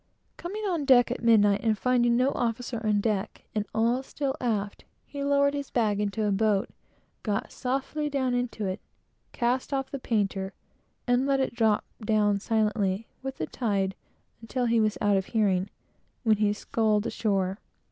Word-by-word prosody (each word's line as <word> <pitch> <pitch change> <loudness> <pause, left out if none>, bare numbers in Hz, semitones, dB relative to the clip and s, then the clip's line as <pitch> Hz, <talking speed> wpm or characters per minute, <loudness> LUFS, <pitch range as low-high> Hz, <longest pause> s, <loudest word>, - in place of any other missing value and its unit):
Coming 410 +5 -6
on 345 -6 0
deck, 250 -3 +5
at - - -3
midnight, 205 -3 +5
and 220 -2 +1
finding 240 0 +2
no 255 +2 +3
officer 235 -1 -2
on 210 -2 +2
deck, 205 -3 -2
and 210 -1 -1
all 230 +3 +1
still 270 0 -3
aft, 210 -4 -2 0.2
he 280 -1 -6
lowered 280 0 +3
his 285 -1 -4
bag 215 -4 +1
into 210 +1 -1
a 205 - +1
boat, 205 0 +1 0.5
got 205 -3 -2
softly 275 +4 -2
down 265 -3 0
into 245 -3 -2
it, 185 +1 -3 0.5
cast 250 +3 -1
off 270 -1 -2
the 275 - -4
painter, 195 -5 -1 0.5
and 245 +2 +2
let 275 -1 +2
it 265 - 0
drop 220 -3 +2 0.5
silently 210 -1 0 0.2
with 270 0 -5
the 155 - -2
tide 195 -2 -1 0.5
until 245 +2 -2
he 230 -1 +3
was 215 -1 +1
out 205 -1 +3
of 190 - -2
hearing, 200 -4 +1 0.5
when 220 -3 +4
he 210 0 +2
sculled 210 0 0
ashore. 195 -2 -1
225 Hz, 165 wpm, -27 LUFS, 205-255 Hz, 0.5 s, deck